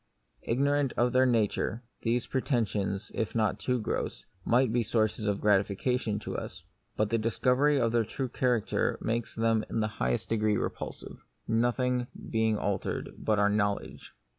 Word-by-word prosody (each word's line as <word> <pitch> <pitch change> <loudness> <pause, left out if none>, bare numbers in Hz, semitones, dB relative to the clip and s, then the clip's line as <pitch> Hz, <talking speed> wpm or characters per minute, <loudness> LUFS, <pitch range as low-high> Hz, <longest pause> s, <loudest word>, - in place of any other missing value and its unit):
Ignorant 140 +2 +1
of 120 0 +2
their 130 0 +5
nature, 115 0 0 0.2
these 120 +1 0
pretensions 110 -6 -1
(if 110 - -2
not 110 -2 +1
too 125 -1 0
gross) 110 - -3 0.2
might 120 0 +3
be 120 - +3
sources 110 -1 0
of 100 -1 0
gratification 105 +3 +1
to - - -5
us; - - -6 0.3
but 110 0 +1
the 115 - +2
discovery 130 +6 +2
of 115 -2 +2
their 115 -1 +3
true 130 +5 -3
character 125 -3 0
makes 115 0 -2
them 115 -1 +2
in - - -1
the 110 - +1
highest 60 0 0
degree 110 -2 +2
repulsive, - - -5 0.2
nothing 120 +2 +1 0.2
being 110 -1 +2
altered 100 -1 -2
but 110 -1 0
our 105 0 +4
knowledge. 100 -1 -2
115 Hz, 155 wpm, -29 LUFS, 105-125 Hz, 0.3 s, their